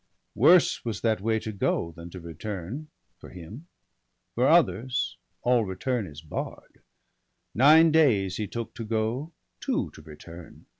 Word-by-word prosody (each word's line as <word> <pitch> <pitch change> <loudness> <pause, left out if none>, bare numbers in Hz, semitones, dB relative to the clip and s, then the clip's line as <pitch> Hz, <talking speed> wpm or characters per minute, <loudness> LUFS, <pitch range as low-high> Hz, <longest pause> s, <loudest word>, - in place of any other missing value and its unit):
Worse 165 +8 +4
was 115 -5 -4
that 110 -3 +1
way 110 +1 +1
to 110 - -5
go 95 -4 -1
than 85 +1 -11
to 90 - -9
return, 95 - -6 0.3
For - - -12
him; 100 - -11 0.3
— - - -51
for - - +2
others 110 +8 +2 0.3
all 120 -1 +3
return 105 +3 -2
is 75 -1 -11
barr'd. 75 - -7 0.7
Nine 155 +6 +6
days 105 - +3
he 105 - -3
took 115 +1 -6
to 115 - -6
go, 115 +7 -2 0.3
two - - -2
to - - -14
return. 85 +2 -13
110 Hz, 150 wpm, -26 LUFS, 90-125 Hz, 0.7 s, Nine